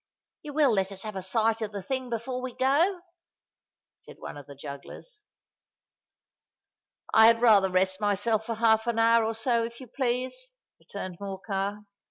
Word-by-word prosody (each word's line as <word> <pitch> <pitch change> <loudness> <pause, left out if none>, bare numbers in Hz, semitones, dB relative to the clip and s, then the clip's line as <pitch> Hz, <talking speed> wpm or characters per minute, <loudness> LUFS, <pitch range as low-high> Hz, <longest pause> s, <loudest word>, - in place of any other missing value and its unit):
"You 300 -3 -8
will 290 -3 +4
let 195 -2 0
us 195 -1 -8
have 215 -2 -6
a 190 - -3
sight 225 +4 0
of 215 -1 -3
the 200 -2 -6
thing 260 +4 -3
before 245 +2 -3
we 255 -1 -6
go?" 330 +8 +2 1.0
said - - -14
one - - -8
of 145 -2 -11
the 140 - -11
jugglers. 140 - -10 1.9
"I 220 0 +8
had 230 0 +5
rather 210 -5 +5
rest 190 +2 +1
myself 210 +2 0
for 230 - -2
half 220 0 +3
an 235 -1 0
hour, 230 0 +4
or 220 0 -2
so 235 0 +1
if 235 0 -6
you 260 - -9
please," 255 - -2 0.3
returned 185 -3 -8
Morcar. 200 +1 -4
225 Hz, 170 wpm, -27 LUFS, 195-245 Hz, 1.9 s, I